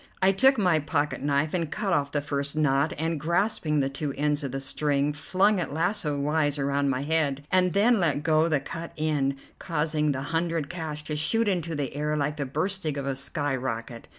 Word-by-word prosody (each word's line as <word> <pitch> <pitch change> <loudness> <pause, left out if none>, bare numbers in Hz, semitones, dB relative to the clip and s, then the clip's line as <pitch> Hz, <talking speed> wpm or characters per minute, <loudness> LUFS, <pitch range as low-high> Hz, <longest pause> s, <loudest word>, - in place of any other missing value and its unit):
I 190 0 +5
took 265 +7 +4
my 180 -6 +3
pocket 145 -2 -1
knife 145 +2 0
and 170 -4 -1
cut 200 -3 -1
off 140 -3 +1
the 145 - 0
first 140 0 -2
knot, 145 0 +2
and, 160 0 -1
grasping 165 -2 +1
the 135 - +1
two 140 0 -4
ends 150 +1 +1
of 135 - -3
the 135 - -3
string, 145 +1 0
flung 185 +7 +2
it 165 - -3
lasso 160 -2 -1
wise 145 0 +1
around 140 0 0
my 135 0 -1
head, 145 -2 0
and 185 -1 +3
then 220 +3 +4
let 155 -4 +1
go 155 +1 +3
the 155 -4 +2
cut 165 +4 -7
end, 145 -3 0 0.2
causing 150 -2 0
the 135 -1 -3
hundred 165 -3 -1
cash 155 -3 -4
to 150 - -3
shoot 225 +9 +2
into 170 -4 -1
the 140 -2 -3
air 150 +1 -1
like 150 +1 -1
the 140 -2 -2
bursting 155 +1 -2
of 140 - -3
a 140 - -1
sky 140 +1 -2
rocket. 115 -2 -5
150 Hz, 205 wpm, -26 LUFS, 140-165 Hz, 0.2 s, I